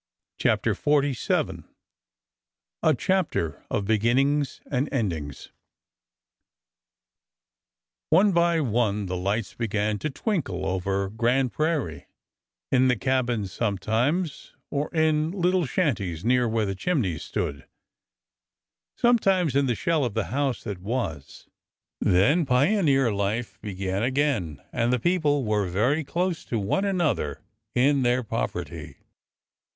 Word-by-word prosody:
CHAPTER - - +2
XLVII 145 -3 0 1.2
A - - +3
chapter 180 - -1
of 100 - -1
beginnings 130 +7 +1
and 140 +1 -1
endings 85 - -3 2.6
O 160 - +7
NE 210 - +4
by 170 -2 +3
one 110 -5 0
the 90 0 -3
lights 100 +4 -2
began 105 -2 -1
to 155 - -2
twinkle 135 - -2
over 95 +1 -1
Grand 120 +3 +1
Prairie,— 155 - -1 0.6
in 130 0 +4
the 125 - +3
cabins 125 -7 0
sometimes, 115 - -1 0.2
or 145 +1 -2
in 155 -1 +2
little 180 -2 +1
shanties 100 - -1
near 125 0 +3
where 110 -1 +1
the 95 - -2
chimneys 100 - -1
stood, 70 -1 -4 0.6
— - - -66
sometimes 195 - +3
in 140 -1 +3
the 120 - +1
shell 160 +4 +1
of 120 -5 -2
the 110 -1 -2
house 140 -2 -1
that 100 -3 -5
was. 95 - -4 0.5
Then 140 - +3
pioneer 135 - +3
life 100 0 -2
began 95 -1 -3
again, 125 - 0
— - - -39
and 120 0 +1
the 125 - +3
people 150 -3 +1
were 105 -2 +1
very 120 - +1
close 175 +3 -2
to 115 - -2
one 105 - 0
another 155 - -1 0.3
in 135 +2 +3
their 125 0 +2
poverty. - - -4
125 Hz, 125 wpm, -25 LUFS, 100-150 Hz, 2.6 s, O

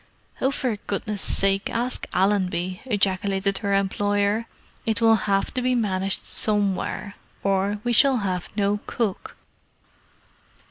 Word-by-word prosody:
"Oh, 265 - +3
for 255 -5 -1
goodness' 205 0 -3
sake, 195 0 +2
ask 240 +2 -2
Allenby!" 185 -2 0
ejaculated 195 -3 0
her 200 -2 0
employer. 205 +2 +1 0.4
"It 220 -1 +1
will 225 -1 +5 0.2
have 195 0 +1
to 255 - -1
be 250 0 +1
managed 195 -4 -1
somewhere, 205 -1 -1 0.3
or 195 +1 +1
we 240 0 0
shall 265 +3 +5
have 185 -4 -2
no 205 0 +1
cook!" 215 -6 -3
200 Hz, 125 wpm, -24 LUFS, 195-225 Hz, 0.4 s, will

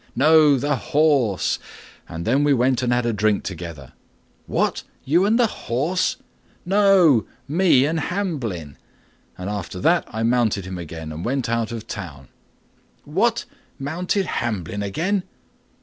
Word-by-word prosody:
"No, 150 +1 +5
the 145 +2 0
horse; 140 - +1 0.5
and 80 +1 -6
then 135 +6 +2
we 145 -1 +4
went 125 +1 +2
and 125 -1 0
had 120 0 +1
a 120 - 0
drink 105 -1 +1
together." 80 -6 -7 0.5
"What! - - 0 0.2
you 170 +8 +3
and 220 +3 +3
the 245 - +4
horse?" 165 - -1 0.5
"No, 185 - +4 0.2
me 155 -4 +4
and 160 +2 0
Hamblin; 135 - -3 0.6
and 90 - -6
after 100 -3 -5
that 175 - +3
I 110 - -4
mounted 115 -5 +1
him 95 -1 -6
again 80 -1 -7
and 80 +2 -6
went 130 0 -1
out 115 -1 -1
of 115 -2 -6
town." 75 -10 -8 0.7
"What! - - 0 0.3
mounted 180 +8 -1
Hamblin 105 - -3
again?" 170 - -1
125 Hz, 140 wpm, -22 LUFS, 100-160 Hz, 0.7 s, No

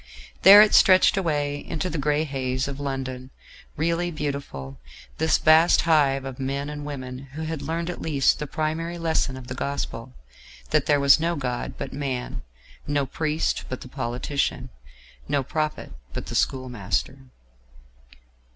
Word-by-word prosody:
There 200 +2 +10
it 215 - +1
stretched 185 -1 +6
away 145 -6 -1
into 165 +2 -3
the 165 -4 -3
grey 150 +2 +1
haze 130 -3 -2
of 140 0 -6
London, 130 -2 -4 0.5
really 170 +3 0
beautiful, 140 - -5 0.4
this 160 0 +3
vast 160 +2 +5
hive 140 -5 +2
of 135 -1 -7
men 140 +2 -3
and 145 0 -6
women 130 -3 -6
who 160 +2 -5
had 160 -1 -4
learned 165 +1 -3
at 180 - -5
least 140 -5 +2
the 150 - -4
primary 160 +4 -3
lesson 160 -5 0
of 130 - -9
the 130 - -6
gospel 140 - -4 0.6
that - - +2
there 145 -1 +4
was 140 +2 +6
no 170 +2 0
God 125 -4 -4
but 135 - -6
man, 130 - -4 0.5
no 145 -1 +1
priest 155 +3 -1
but 130 - -5
the - - -9
politician, 130 +2 -3 0.6
no 140 -1 0
prophet 155 +3 -3 0.2
but - - -5
the - - -7
schoolmaster. 125 -1 -1
145 Hz, 150 wpm, -24 LUFS, 130-160 Hz, 0.6 s, There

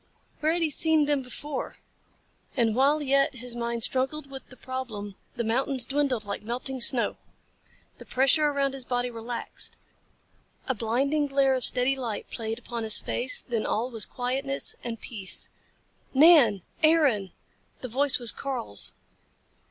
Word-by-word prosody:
Where 310 +1 +1
had 340 0 0
he 315 - 0
seen 315 0 +2
them 290 -1 +1
before? 265 +2 -6 0.8
And 230 -3 +2
while 285 +4 +3
yet 275 0 +2
his 245 0 -5
mind 235 -1 -3
struggled 270 +3 0
with 270 -1 -8
the 255 - -14
problem 230 -6 -6 0.2
the 235 - -2
mountains 255 +2 +1
dwindled 270 -6 -1
like 200 - -5
melting 250 +4 -3
snow. 235 0 +5 0.8
The - - -11
pressure 275 +4 +3
around 280 -2 0
his 270 -1 -4
body 245 0 -2
relaxed. 230 +1 -5 0.9
A 260 - +1
blinding 270 +7 0
glare 275 -1 +2
of 255 -1 -1
steady 255 +2 +3
light 240 -5 -5
played 225 0 -4
upon 235 -1 -6
his 220 -1 +5
face. 255 +1 0
Then 230 -3 -2
all 240 +4 -1
was 225 -3 -1
quietness 270 +2 -3
and 230 -2 -5
peace. 195 -6 -3 0.7
"Nan! 270 - +6 0.2
Aaron!" 290 - +3 0.5
The 255 - -4
voice 270 +4 +2
was 240 -3 +6
Karl's. 100 - -3
255 Hz, 150 wpm, -26 LUFS, 235-275 Hz, 0.9 s, Nan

